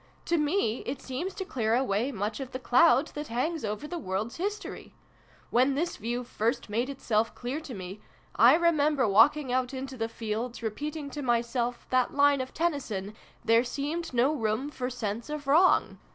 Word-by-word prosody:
" - - -33
To 340 - +4
me 300 - +1
it 265 +1 -3
seems 290 +10 -5
to 380 - -4
clear 230 -8 0
away 245 0 0
much 210 0 -3
of 265 -2 -6
the - - -2
cloud 265 +4 +4
that 295 0 -6
hangs 290 +7 -2
over 210 +6 -3
the 345 +2 -4
world's 205 -1 -3
history. 405 +4 -5 0.6
When 260 +3 +3
this 335 +5 -1
view 240 +3 -3
first 235 -1 -2
made 235 +5 0
itself 230 -5 -1
clear 250 +5 -4
to 295 -6 -8
me, 190 +2 -8 0.3
I 240 +6 +7
remember 305 -6 +3
walking 250 +7 +4
out 255 +1 0
into 265 0 -6
the 225 -1 -2
fields, 230 +2 -4
re 220 - 0
peating 295 +4 -5
to 295 - -5
myself 240 -1 -1
that 255 0 +2
line 285 -1 +4
of 260 - -6
Tennyson 250 - -2 0.2
' - - -30
There 230 +1 +5
seemed 290 +7 -3
no 255 +4 +3
room 230 +2 -1
for 250 -3 -3
sense 230 0 -4
of 300 -1 -5
wrong 325 +7 +4
255 Hz, 190 wpm, -28 LUFS, 230-295 Hz, 0.6 s, I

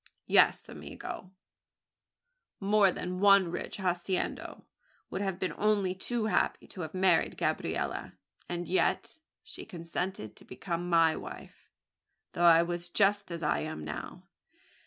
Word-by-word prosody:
"Yes, - - +4
amigo! 185 - -8 1.3
more 200 -1 +4
than 180 +1 -4
one 195 -3 +6
rich - - -5
haciendado 180 -1 -2 0.5
would 190 - -3
have 195 -3 -2
been 185 -4 -2
only 205 -3 +2
too 225 +4 -2
happy 215 - 0
to 185 - -7
have 160 +1 -6
married 185 0 +3
Gabriella; - - -2 0.4
and 175 -1 -3
yet 185 - 0 0.2
she - - -8
consented 170 - -5
to - - -14
become 170 +6 -4
my 165 -2 +4
wife, - - -10 0.6
though 175 - +1
I 165 0 +7
was 175 0 -4
just 200 +2 +2
as 170 -1 -5
I 150 - +1
am 155 - -5
now. 75 -1 -7
180 Hz, 135 wpm, -30 LUFS, 170-195 Hz, 1.3 s, I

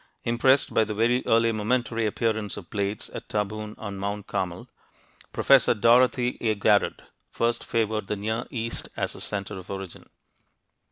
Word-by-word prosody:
Impressed 130 +4 +3
by 110 - +4
the 105 0 -4
very 120 +4 +2
early 115 0 +4
momentary 115 +1 0
appearance 110 -1 -1
of 95 -4 -10
blades 100 0 -2
at - - -8
Tabun 105 0 -3
on 100 -3 -6
Mount 100 +1 -3
Carmel, 90 -1 -3 0.6
Professor 135 -3 +4
Dorothy 125 +2 +3
A. 110 -2 +1
Garrod 100 0 +2 0.3
first 120 0 0
favored 110 -3 -1
the 105 - -1
Near 110 +4 -2
East 115 -1 -4
as - - -2
a - - -10
center 100 -1 -4
of 90 - -13
origin. 95 -2 -7
110 Hz, 155 wpm, -26 LUFS, 100-115 Hz, 0.6 s, by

